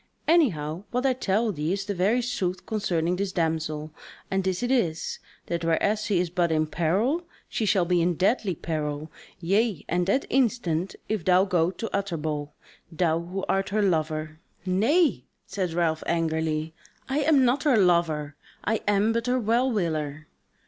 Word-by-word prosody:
Anyhow 185 - +2
what 250 +2 -1
I 265 - +4
tell 220 -2 0
thee 155 -2 -2
is 195 0 -3
the 205 - -2
very 205 +7 +2
sooth 185 -7 -2
concerning 180 -5 0
this 195 0 -2
damsel, 160 -2 -1 0.4
and 195 0 +1
this 190 +3 -1
it 245 - 0
is: 170 -12 0 0.3
that 170 -1 -3
whereas 200 +6 +1
she 200 - +1
is 175 -2 -1
but 175 -2 +1
in 155 0 +2
peril, 200 - 0 0.2
she 220 - -2
shall 190 -3 +3
be 175 0 +2
in 175 +1 +1
deadly 195 +1 +1
peril, 155 -1 -4 0.3
yea 195 +1 +1
and 175 +1 0
that 260 +8 +2
instant, 210 -9 +1
if 215 -5 -2
thou 185 +2 +4
go 175 -4 +2
to 190 +5 -5
Utterbol, 155 -7 -2 0.4
thou, 165 0 +1
who 180 +3 -5
art 195 0 0
her 210 +1 +1
lover..." 155 -3 -1 0.3
"Nay," 245 - +2 0.2
said 185 -4 -3
Ralph 165 -2 +1
angrily, 160 -1 -1 0.3
"I 275 +2 0
am 285 -3 +4
not 250 +4 +2
her 285 -6 +3
lover, 165 -6 +2 0.3
I 220 +1 0
am 205 +2 +3
but 230 +1 -1
her 250 +1 +2
well 235 +3 +2
willer." 155 -7 -2
180 Hz, 170 wpm, -26 LUFS, 160-220 Hz, 0.4 s, I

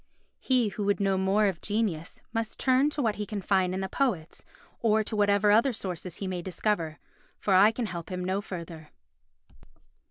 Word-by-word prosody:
He 250 -4 +2
who 205 0 -4
would 205 +1 +1
know 195 -1 +2
more 190 +3 +2
of 190 -4 -1
genius 205 -7 -2
must 225 -1 -2
turn 260 +2 +3
to 295 -1 -2
what 220 -3 0
he 210 - -3
can 210 0 -4
find 190 -1 +1
in 190 +1 -2
the 190 - -2
poets, 195 - -2 0.4
or 220 -1 +3
to 215 - -5
whatever 205 0 +3
other 235 +5 +4
sources 180 -4 -4
he 200 - -5
may 185 -2 -3
discover, 175 -3 -2 0.4
for 200 - 0
I 195 +3 +7
can 230 +2 -3
help 170 -5 -6
him 180 0 -3
no 190 +2 0
further. 170 -5 -8
200 Hz, 190 wpm, -28 LUFS, 185-220 Hz, 0.4 s, I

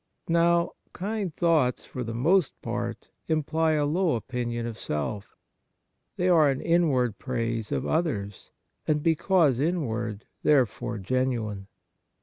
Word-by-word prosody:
Now, 170 0 +3 0.2
kind 200 -1 -3
thoughts 155 -6 +1
for 130 - -6
the 115 -1 -5
most 160 +6 +2
part 120 0 -4 0.2
imply 160 0 +1
a 150 -1 +2
low 165 0 +1
opinion 120 0 -3
of 115 -1 -4
self. 100 +3 -4 0.8
They 180 - 0
are 165 -4 +6
ari 135 -1 0
inward 145 - +2
praise 115 -4 -2
of - - -1
others, 110 - -2 0.4
and 150 -1 +1
because 160 -5 +3
in 170 +3 +1
ward 110 -3 -4 0.2
therefore 125 -4 +2
genuine. 110 -2 -1
130 Hz, 130 wpm, -27 LUFS, 115-165 Hz, 0.8 s, are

